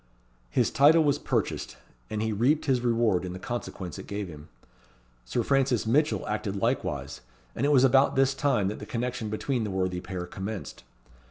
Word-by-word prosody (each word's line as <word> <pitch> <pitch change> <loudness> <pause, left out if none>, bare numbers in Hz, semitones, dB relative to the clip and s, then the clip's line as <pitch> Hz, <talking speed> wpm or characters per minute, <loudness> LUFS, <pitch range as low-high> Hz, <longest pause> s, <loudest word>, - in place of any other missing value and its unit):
His - - +1
title 150 +6 +6
was 145 -2 +2
purchased, - - -2 0.3
and 110 0 -2
he 110 -1 -1
reaped 130 +9 +2
his 130 -4 +2
reward 115 -6 +2
in 90 -1 -5
the - - -6
consequence 95 -7 -5
it - - -9
gave 100 -2 -4
him. 75 -1 -11 0.8
Sir - - -1
Francis 135 -5 +2
Mitchell 150 +7 +1
acted 105 -2 -2
likewise; 100 - -2 0.3
and 140 - +1
it - - +3
was 135 -3 +5
about 135 +1 +4
this 135 0 +3
time 135 -8 +1
that 105 - -5
the - - -8
connection 120 -2 -3
between 120 +3 -1
the 105 - -3
worthy 95 -1 -1
pair 90 -1 -5
commenced. 95 +3 -6
115 Hz, 180 wpm, -27 LUFS, 95-135 Hz, 0.8 s, title